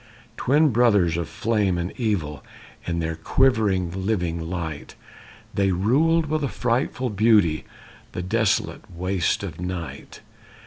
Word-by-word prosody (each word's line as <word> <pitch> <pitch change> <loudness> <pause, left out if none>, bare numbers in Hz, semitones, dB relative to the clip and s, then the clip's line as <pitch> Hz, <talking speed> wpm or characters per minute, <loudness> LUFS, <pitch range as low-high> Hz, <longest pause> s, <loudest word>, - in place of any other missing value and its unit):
Twin 145 +6 +3
brothers 105 -9 +3
of 85 -2 -3
flame 105 -5 0
and 85 +1 -3
evil, 90 - -2 0.4
In 85 -1 -1
their 80 -1 -2
quivering 95 -3 +1
living 85 -6 -1
light, 80 -5 -5 0.6
They 100 -1 +2
ruled 145 - +2
with 155 0 -1
a - - +1
frightful 125 +1 -1
beauty 105 -7 +3 0.5
The 90 - -4
desolate 110 +3 0
waste 90 +1 -1
of 85 -4 -6
night. 90 -2 -6
95 Hz, 125 wpm, -24 LUFS, 85-115 Hz, 0.6 s, Twin